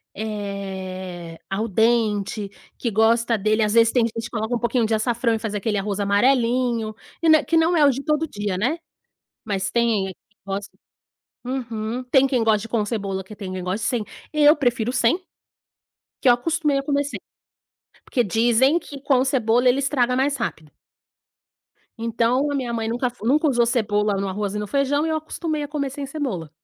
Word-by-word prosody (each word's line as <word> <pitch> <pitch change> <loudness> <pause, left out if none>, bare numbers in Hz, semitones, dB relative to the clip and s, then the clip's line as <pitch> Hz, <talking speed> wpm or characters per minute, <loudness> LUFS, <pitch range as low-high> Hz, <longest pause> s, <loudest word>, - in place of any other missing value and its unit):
eh, 190 -5 -6
al 210 +4 -1
dente, 215 -1 +1 0.3
que 235 - -2
gosta 230 +2 +3
dele 215 +2 +1
às 210 0 +1
vezes, 230 0 +5
tem 245 -3 +3
gente 230 0 -4
que - - -7
coloca 220 +1 -2
um 235 - -2
pouquinho 235 -1 +1
de 225 - 0
açafrão 235 +1 0
e 220 - -3
faz 215 -2 -4
aquele 210 +1 -1
arroz 200 0 -2
amarelinho, 235 +2 +2 0.3
que 330 - +3
nã 315 -1 +6
que 330 - 0
não 330 +2 +3
é 300 - +5
o - - +6
de 270 +2 -5
todo 305 0 0
dia, 205 -6 -3
né, 250 - 0 0.7
mas 195 -3 -2
tem 230 -5 +1
quem 190 - -7 0.3
gosta. 200 +1 -5 0.7
Uhum. 235 -2 -3
Tem 270 -1 +5
quem 255 -3 +1
goste 220 0 +2
com 225 -1 0
cebola, 195 -4 -3
que 210 +3 -12
tem 195 -3 -7
quem 185 -1 -4
goste 190 +4 -2
sem, 240 -4 0 0.3
eu 300 0 +6
prefiro 245 -4 0
sem, 255 +4 +2 1.0
que - - +3
eu - - +9
acostumei 300 +2 0
a - - -2
comer 285 0 0
sem. 285 - -5 0.9
Porque 245 - +1
dizem 240 - +3
que 285 -4 -10
com 265 -2 +3
cebola 245 -2 +2
ele 250 +2 +4
estraga 255 -3 +1
mais 275 +2 +1
rápido. 160 -10 -4 1.3
Então, 235 +5 +1
a - - -1
minha 250 -4 -2
mãe 225 -1 -2
nunca 245 +2 -1
fe 240 -3 -16
nunca 300 +6 +3
usou 240 -4 +3
cebola 210 -4 +1
no 195 - -2
arroz 200 +1 -3
e 210 - -1
no 210 - -4
feijão 280 +4 +1
e 325 - -1
eu 315 - +1
acostumei 310 -1 -3
a - - -4
comer 285 -2 -3
sem 280 +1 -5
cebola. 265 - -4
235 Hz, 190 wpm, -22 LUFS, 210-270 Hz, 1.3 s, eu